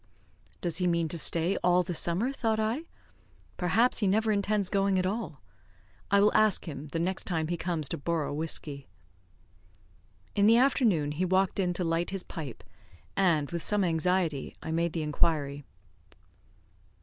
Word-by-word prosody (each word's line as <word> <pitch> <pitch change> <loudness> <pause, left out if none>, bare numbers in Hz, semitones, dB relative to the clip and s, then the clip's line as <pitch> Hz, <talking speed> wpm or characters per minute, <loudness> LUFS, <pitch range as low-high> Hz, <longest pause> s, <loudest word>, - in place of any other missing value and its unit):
"Does 170 -2 -1
he 180 -1 0
mean 170 -1 +1
to 170 - -1
stay 170 +4 +3
all 180 0 +3
the 175 - -4
summer?" 175 +10 0
thought 225 -5 0
I. 225 +9 -1 0.7
"Perhaps 215 +8 +2
he 205 - +1
never 220 +3 +2
intends 205 -1 0
going 195 0 +1
at 185 - +1
all. 190 - -4 0.7
I 200 - +4
will 210 +1 +4
ask 215 -3 +3
him, 145 -1 -6
the 160 - -4
next 185 +3 -2
time 160 -3 -2
he 175 - 0
comes 165 -3 -2
to - - -4
borrow 160 -1 -2
whiskey." 150 -2 -4 1.5
In 205 0 +3
the 230 +1 +6
afternoon 225 - +2
he 155 +5 -2
walked 190 +2 +1
in 180 -2 +1
to 180 - -1
light 165 +1 0
his 195 -1 -4
pipe, 150 -7 -8 0.5
and, 165 -7 +2
with 170 -1 -3
some 205 +2 +1
anxiety, 170 -3 0
I 160 - -4
made 170 +1 0
the 165 - -2
inquiry. 145 -2 0
175 Hz, 165 wpm, -29 LUFS, 160-200 Hz, 1.5 s, the